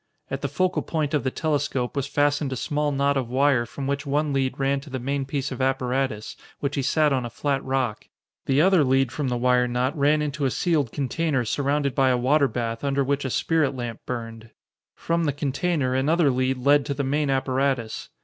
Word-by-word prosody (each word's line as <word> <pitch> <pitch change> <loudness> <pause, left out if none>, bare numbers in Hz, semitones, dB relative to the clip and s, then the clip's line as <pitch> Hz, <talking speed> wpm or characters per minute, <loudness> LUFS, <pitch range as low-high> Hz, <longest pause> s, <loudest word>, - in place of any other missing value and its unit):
At 135 0 -3
the 140 - -1
focal 185 +6 0
point 155 -3 -2
of 150 - +1
the 130 - +1
telescope 140 -4 -1
was 140 -1 -1
fastened 145 0 +1
a - - -2
small 145 +4 -1
knot 140 0 +1
of 125 -3 -2
wire 130 -2 +2
from 135 +4 -6
which 140 +1 -1
one 145 0 0
lead 135 -1 0
ran 140 0 +1
to 140 +2 -12
the 130 - -3
main 135 +2 -2
piece 135 0 -3
of 130 - -5
apparatus, 130 -3 -1 0.2
which 140 0 -2
he 140 - 0
sat 150 +2 +2
on 130 -2 0
a 120 - -4
flat 135 +3 -2
rock. 130 -5 -1 0.4
The 135 +2 +3
other 185 -2 +5
lead 135 -1 +2
from 145 -1 -2
the 125 -1 -1
wire 125 0 +3
knot 125 +4 -1
ran 150 +1 +2
into 145 -1 -2
a - - +3
sealed 145 -4 0
container 145 -1 -1
surrounded 140 +3 0
by 135 -1 +3
a 125 - +3
water 140 +4 +3
bath 115 -2 -3
under 140 0 +1
which 140 +1 -1
a - - -1
spirit 150 +1 +1
lamp 120 -3 -5
burned. 115 -2 -6 0.5
From 170 0 -1
the 145 - 0
container 145 -1 -1
another 145 +3 +3
lead 130 +1 0
led 140 +3 +4
to 140 - -2
the 140 - -1
main 145 +2 0
apparatus. 130 -3 -1
135 Hz, 215 wpm, -24 LUFS, 130-145 Hz, 0.5 s, other